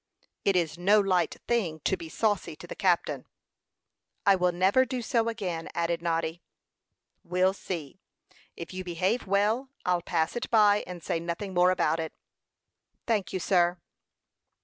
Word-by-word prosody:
"It 195 Hz, -, +2 dB
is 170 Hz, -1 st, 0 dB
no 200 Hz, +4 st, +5 dB
light 185 Hz, -4 st, +1 dB
thing 190 Hz, -10 st, 0 dB
to 190 Hz, -, +1 dB
be 170 Hz, -3 st, -9 dB
saucy 205 Hz, -3 st, -1 dB
to 165 Hz, -, -11 dB
the -, -, -7 dB
captain." 170 Hz, -7 st, 0 dB, 1.0 s
"I 200 Hz, -, +7 dB
will 180 Hz, -1 st, +2 dB
never 190 Hz, +8 st, +3 dB
do 255 Hz, -1 st, -4 dB
so 230 Hz, 0 st, +1 dB
again," 185 Hz, -8 st, -4 dB
added 170 Hz, 0 st, 0 dB
Noddy. 165 Hz, 0 st, -1 dB, 0.8 s
"We'll 180 Hz, +2 st, +2 dB
see; 170 Hz, -7 st, -6 dB, 0.6 s
if 170 Hz, +2 st, -7 dB
you 185 Hz, 0 st, -4 dB
behave 185 Hz, +6 st, -1 dB
well, 210 Hz, +7 st, +1 dB, 0.2 s
I'll 180 Hz, -1 st, +2 dB
pass 165 Hz, +1 st, -1 dB
it 240 Hz, +1 st, -3 dB
by, 210 Hz, -2 st, +5 dB
and 180 Hz, -2 st, -8 dB
say 165 Hz, -, -1 dB
nothing 170 Hz, +4 st, -4 dB
more 180 Hz, 0 st, +5 dB
about 165 Hz, -3 st, +1 dB
it." 160 Hz, -1 st, -4 dB, 0.9 s
"Thank 205 Hz, -7 st, 0 dB
you, 185 Hz, -, -2 dB
sir." 175 Hz, -1 st, +2 dB
180 Hz, 155 wpm, -28 LUFS, 170-205 Hz, 1.0 s, I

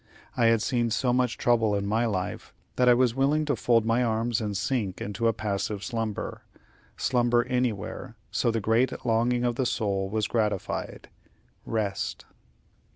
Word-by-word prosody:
I 120 Hz, -, +2 dB
had 115 Hz, -1 st, +3 dB
seen 120 Hz, -2 st, +1 dB
so 120 Hz, +2 st, +1 dB
much 125 Hz, -1 st, +1 dB
trouble 115 Hz, -3 st, +2 dB
in 100 Hz, 0 st, -1 dB
my 110 Hz, +3 st, +1 dB
life, 95 Hz, -4 st, -4 dB, 0.2 s
that 125 Hz, 0 st, +4 dB
I 120 Hz, -, +7 dB
was 125 Hz, -2 st, +3 dB
willing 140 Hz, +4 st, +2 dB
to 145 Hz, -2 st, 0 dB
fold 115 Hz, 0 st, +2 dB
my 115 Hz, +2 st, +2 dB
arms 115 Hz, 0 st, 0 dB
and 105 Hz, -2 st, -2 dB
sink 100 Hz, -1 st, -1 dB
into 105 Hz, +3 st, -2 dB
a -, -, +4 dB
passive 105 Hz, -1 st, -3 dB
slumber 115 Hz, -4 st, -3 dB, 0.6 s
slumber 120 Hz, -2 st, +2 dB
anywhere, 125 Hz, -1 st, -2 dB, 0.2 s
so 120 Hz, -, +1 dB
the 115 Hz, 0 st, 0 dB
great 120 Hz, +5 st, +1 dB
longing 120 Hz, +1 st, +2 dB
of 120 Hz, -1 st, 0 dB
the 130 Hz, -, +1 dB
soul 100 Hz, -5 st, -1 dB
was 110 Hz, +1 st, 0 dB
gratified 105 Hz, -4 st, -2 dB, 0.6 s
rest. 105 Hz, -3 st, -2 dB
115 Hz, 160 wpm, -27 LUFS, 105-125 Hz, 0.6 s, I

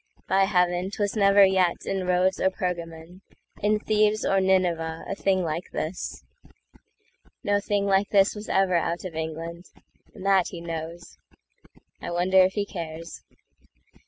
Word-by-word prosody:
By 195 Hz, 0 st, +3 dB
heaven,'Twas 185 Hz, +2 st, 0 dB
never 200 Hz, -1 st, +6 dB
yet 185 Hz, -2 st, +1 dB
in 190 Hz, -2 st, -2 dB
Rhodes 180 Hz, +1 st, +2 dB
or 190 Hz, -, +3 dB
Pergamon—In 180 Hz, +3 st, -4 dB
Thebes 215 Hz, 0 st, +1 dB
or 195 Hz, 0 st, +2 dB
Nineveh, 175 Hz, -4 st, 0 dB
a -, -, -3 dB
thing 190 Hz, -1 st, 0 dB
like 165 Hz, +2 st, -4 dB
this! 170 Hz, +4 st, -5 dB, 1.2 s
No 205 Hz, 0 st, +2 dB
thing 205 Hz, 0 st, -1 dB
like 195 Hz, 0 st, +2 dB
this 200 Hz, -1 st, +4 dB
was 210 Hz, +1 st, -9 dB
ever 190 Hz, -1 st, +2 dB
out 170 Hz, +2 st, -2 dB
of 180 Hz, -, -6 dB
England; 165 Hz, +2 st, -5 dB, 0.5 s
And 185 Hz, -, -10 dB
that 195 Hz, -2 st, +3 dB
he 175 Hz, -, -8 dB
knows. 170 Hz, +1 st, -7 dB, 0.8 s
I -, -, -5 dB
wonder 180 Hz, +2 st, +2 dB
if 185 Hz, +1 st, +3 dB
he 205 Hz, -1 st, -1 dB
cares. 165 Hz, -3 st, -7 dB
185 Hz, 140 wpm, -25 LUFS, 170-195 Hz, 1.2 s, never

